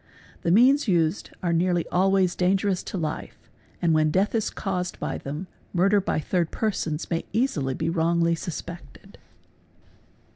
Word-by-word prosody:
The -, -, -1 dB
means 250 Hz, +9 st, +5 dB
used 170 Hz, -1 st, +1 dB
are 170 Hz, -1 st, +1 dB
nearly 175 Hz, 0 st, +1 dB
alway 190 Hz, +1 st, +3 dB
dangerous 185 Hz, +2 st, +1 dB
to -, -, -4 dB
life 155 Hz, -3 st, -4 dB, 0.5 s
and 165 Hz, -2 st, +4 dB
when 155 Hz, 0 st, +3 dB
death 190 Hz, +6 st, +1 dB
is 225 Hz, -2 st, 0 dB
caused" 180 Hz, -2 st, -3 dB
by -, -, -3 dB
them, 150 Hz, +6 st, -5 dB, 0.3 s
murder 195 Hz, +3 st, +3 dB
by 185 Hz, -, -1 dB
thir 175 Hz, +3 st, 0 dB
persons 165 Hz, -5 st, -2 dB
may 165 Hz, -, 0 dB
easily 155 Hz, -, 0 dB
be -, -, -2 dB
wrongly 170 Hz, 0 st, +2 dB
suspected. 170 Hz, -3 st, -8 dB
175 Hz, 145 wpm, -25 LUFS, 165-195 Hz, 0.5 s, means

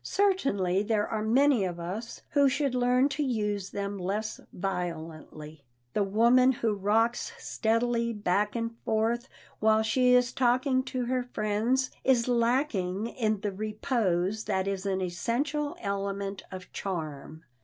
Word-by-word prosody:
Certainly 240 Hz, -, +1 dB
there 210 Hz, 0 st, 0 dB
are 220 Hz, -1 st, -2 dB
many 250 Hz, +1 st, +3 dB
of 175 Hz, -2 st, -3 dB
us 195 Hz, +7 st, -6 dB
who 280 Hz, -2 st, +4 dB
should 275 Hz, 0 st, 0 dB
learn 250 Hz, +1 st, +3 dB
to 295 Hz, +2 st, -3 dB
use 210 Hz, -7 st, -1 dB
them 200 Hz, 0 st, -4 dB
less 205 Hz, +4 st, -3 dB
violently. 160 Hz, -5 st, -5 dB, 0.3 s
The -, -, +1 dB
woman 235 Hz, +6 st, +4 dB
who 230 Hz, -3 st, 0 dB
rocks 225 Hz, -, +1 dB
steadily 235 Hz, -, 0 dB
back 210 Hz, 0 st, 0 dB
and 230 Hz, 0 st, -2 dB
forth 230 Hz, +3 st, 0 dB, 0.3 s
while 220 Hz, 0 st, +4 dB
she 250 Hz, +3 st, +4 dB
is 250 Hz, 0 st, +3 dB
talking 255 Hz, +1 st, +2 dB
to 255 Hz, -2 st, -2 dB
her 255 Hz, +1 st, 0 dB
friends 245 Hz, +2 st, 0 dB
is 250 Hz, -3 st, +3 dB
lacking 230 Hz, -5 st, +1 dB
in 215 Hz, -4 st, -1 dB
the 205 Hz, -, -1 dB
repose 215 Hz, -1 st, -1 dB
that 190 Hz, 0 st, 0 dB
is 195 Hz, 0 st, -2 dB
an 190 Hz, -1 st, 0 dB
essential 280 Hz, -, -2 dB
element 200 Hz, 0 st, -3 dB
of 185 Hz, -1 st, -9 dB
charm. 160 Hz, -4 st, -5 dB
220 Hz, 140 wpm, -28 LUFS, 195-250 Hz, 0.3 s, who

